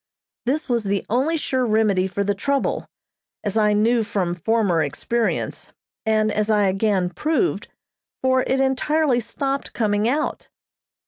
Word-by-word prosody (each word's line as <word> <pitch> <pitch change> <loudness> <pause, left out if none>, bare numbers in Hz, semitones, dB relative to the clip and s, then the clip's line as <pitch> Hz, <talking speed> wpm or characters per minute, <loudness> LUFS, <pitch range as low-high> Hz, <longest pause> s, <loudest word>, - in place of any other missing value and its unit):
This 295 +5 0
was 235 -4 0
the 200 0 -1
only 280 +8 +2
sure 260 -4 -1
remedy 215 -5 +2
for 200 +1 -2
the 205 0 +1
trouble, 275 +7 -1 0.6
as 205 - -2
I 210 -1 +3
knew 225 +3 +3
from 185 -4 -1
former 185 -1 +1
experience, 225 +10 -2 0.3
and 215 -1 +2
as 210 +1 -1
I 210 -1 +3
again 195 -2 +1
proved, 320 - 0 0.6
for 260 0 +3
it 265 +1 0
entirely 270 0 +2
stopped 275 +4 -3
coming 210 0 +1
out. 300 +4 -2
220 Hz, 140 wpm, -22 LUFS, 205-260 Hz, 0.6 s, I